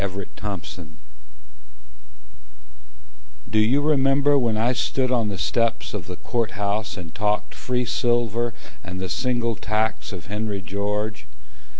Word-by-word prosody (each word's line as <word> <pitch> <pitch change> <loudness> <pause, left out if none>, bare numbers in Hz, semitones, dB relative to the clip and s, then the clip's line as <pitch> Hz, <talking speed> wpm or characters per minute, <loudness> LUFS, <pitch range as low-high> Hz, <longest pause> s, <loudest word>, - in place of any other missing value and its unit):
George 100 0 -3
Trimble 90 -5 -6 2.5
Do 110 -1 +2
you 120 +7 +4
remember 145 -1 +4
when 120 -5 +3
I 120 +3 +3
stood 130 0 +1
on 120 -4 +3
the 100 - -3
steps 115 +8 +1
Of 105 -5 -4
the 90 - -5
Court 115 +4 -1
House 100 +1 -1
and 85 -3 -7
talked 105 +2 0
free 125 -1 -1
silver, 120 -1 +1 0.3
And 95 -1 -6
the 95 0 -3
single 120 -1 0
tax 110 +3 -1
of 95 -4 -7
Henry 105 0 -2
George? 105 +3 -2
110 Hz, 130 wpm, -24 LUFS, 100-120 Hz, 2.5 s, you